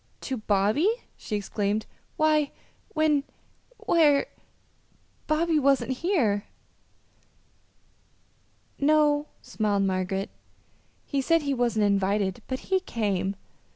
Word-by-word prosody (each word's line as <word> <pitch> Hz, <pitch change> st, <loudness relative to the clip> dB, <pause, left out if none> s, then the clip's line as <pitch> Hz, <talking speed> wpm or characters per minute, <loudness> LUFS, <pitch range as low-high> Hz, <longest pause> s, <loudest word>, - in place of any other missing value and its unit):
"To 265 Hz, -, -3 dB
Bobby!" 215 Hz, -, +2 dB, 0.3 s
she 215 Hz, -, -5 dB
exclaimed. 205 Hz, +1 st, -1 dB, 0.3 s
"Why, 305 Hz, -2 st, +3 dB, 0.5 s
when 305 Hz, -2 st, +3 dB, 0.6 s
where 295 Hz, -4 st, +4 dB, 1.0 s
Bobby 315 Hz, 0 st, +2 dB
wasn't 275 Hz, -1 st, +2 dB
here." 255 Hz, -, +1 dB, 2.3 s
"No," 295 Hz, 0 st, +3 dB, 0.2 s
smiled 205 Hz, -2 st, 0 dB
Margaret. 190 Hz, 0 st, -1 dB, 0.7 s
"He 280 Hz, -2 st, -1 dB
said 330 Hz, +3 st, +2 dB
he 280 Hz, -1 st, 0 dB
wasn't 235 Hz, -4 st, +1 dB
invited, 200 Hz, +1 st, +1 dB
but 260 Hz, 0 st, -3 dB
he 380 Hz, -, +5 dB
came. 200 Hz, -, -2 dB
255 Hz, 90 wpm, -26 LUFS, 205-305 Hz, 2.3 s, he